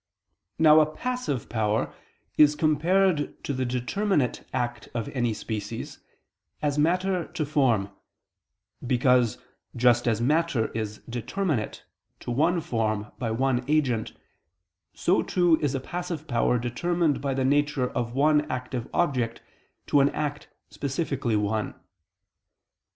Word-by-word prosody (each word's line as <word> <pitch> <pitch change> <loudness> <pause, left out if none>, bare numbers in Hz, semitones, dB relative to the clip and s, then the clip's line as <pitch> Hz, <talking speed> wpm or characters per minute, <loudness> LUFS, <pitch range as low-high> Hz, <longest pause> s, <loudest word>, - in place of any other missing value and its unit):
Now 155 -1 +7
a 155 - +4
passive 250 - -3
power 110 -1 0 0.4
is 150 -1 +6
compared 160 +2 +1
to 145 - -2
the 130 0 -1
determinate 130 - 0
act 120 -2 -3
of 115 -2 -2
any 120 -3 0
species, 110 0 -5 0.6
as 145 -1 0
matter 180 +3 +1
to 155 - -3
form: 125 -10 +1 1.0
because, 125 -2 +3 0.4
just 120 0 +3
as 115 -2 +2
matter 145 -2 +1
is 110 -1 -5
determinate 125 - -2 0.4
to - - -5
one 165 +7 +2
form 110 -8 -2
by 120 -3 -1
one 125 +2 +1
agent, 135 -7 +1 0.8
so, 180 - +2
too, 175 -3 +3
is 145 -2 0
a - - 0
passive 170 +2 -5
power 120 0 +2
determined 155 +7 0
by 140 -2 -1
the 130 -1 0
nature 145 -1 +2
of 120 0 -3
one 150 +1 +3
active 125 -1 -4
object 125 -9 0 0.4
to 145 - +3
an 140 +1 +5
act 150 -1 -4 0.2
specifically 140 -4 -2
one. 105 +1 -1
135 Hz, 125 wpm, -26 LUFS, 120-155 Hz, 1.0 s, Now